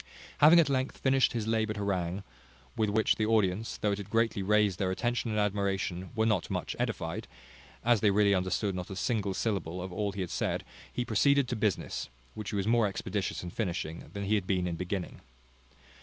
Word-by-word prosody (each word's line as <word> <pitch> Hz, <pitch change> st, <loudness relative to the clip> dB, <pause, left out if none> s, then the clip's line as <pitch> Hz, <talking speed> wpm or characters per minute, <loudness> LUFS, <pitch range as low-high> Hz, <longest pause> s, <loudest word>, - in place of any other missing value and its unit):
Having 160 Hz, +4 st, +8 dB
at 165 Hz, -, +5 dB
length 130 Hz, -1 st, -1 dB
finished 135 Hz, -1 st, +3 dB
his 115 Hz, -3 st, -2 dB
laboured 110 Hz, -1 st, 0 dB
harangue, 95 Hz, -2 st, -1 dB, 0.5 s
with 110 Hz, -3 st, +1 dB
which 110 Hz, +2 st, +2 dB
the 110 Hz, -, +1 dB
audience, 110 Hz, -1 st, +1 dB
though 105 Hz, -, 0 dB
it 100 Hz, -, -1 dB
had 100 Hz, -1 st, -7 dB
greatly 115 Hz, -1 st, +1 dB
raised 105 Hz, -1 st, +2 dB
their 95 Hz, -, +1 dB
attention 120 Hz, +5 st, -1 dB
and 105 Hz, -1 st, 0 dB
admiration, 95 Hz, -3 st, -1 dB
were 110 Hz, 0 st, +2 dB
not 105 Hz, -6 st, +1 dB
much -, -, -3 dB
edified, 85 Hz, +7 st, -2 dB, 0.6 s
as 120 Hz, -2 st, +5 dB
they 105 Hz, -, +5 dB
really 100 Hz, 0 st, +4 dB
understood 95 Hz, +2 st, 0 dB
not 90 Hz, -1 st, -5 dB
a 95 Hz, -, -5 dB
single 100 Hz, -1 st, -1 dB
syllable 95 Hz, -6 st, -2 dB
of 90 Hz, 0 st, -5 dB
all 105 Hz, +1 st, -1 dB
he 100 Hz, 0 st, -5 dB
had 90 Hz, -, -4 dB
said, -, -, -1 dB, 0.3 s
he 120 Hz, -, -2 dB
proceeded 140 Hz, +5 st, +3 dB
to 125 Hz, -, -2 dB
business, 105 Hz, -, -1 dB, 0.2 s
which 105 Hz, -2 st, -6 dB
he -, -, -3 dB
was 100 Hz, -1 st, 0 dB
more 115 Hz, -1 st, +3 dB
expeditious 100 Hz, -1 st, -3 dB
in 90 Hz, -, -6 dB
finishing, 85 Hz, -6 st, -3 dB
than 100 Hz, -, -4 dB
he 100 Hz, +2 st, 0 dB
had 100 Hz, -4 st, +1 dB
been 90 Hz, -2 st, +1 dB
in 85 Hz, -2 st, -2 dB
beginning. 90 Hz, +1 st, -4 dB
105 Hz, 200 wpm, -30 LUFS, 95-110 Hz, 0.6 s, Having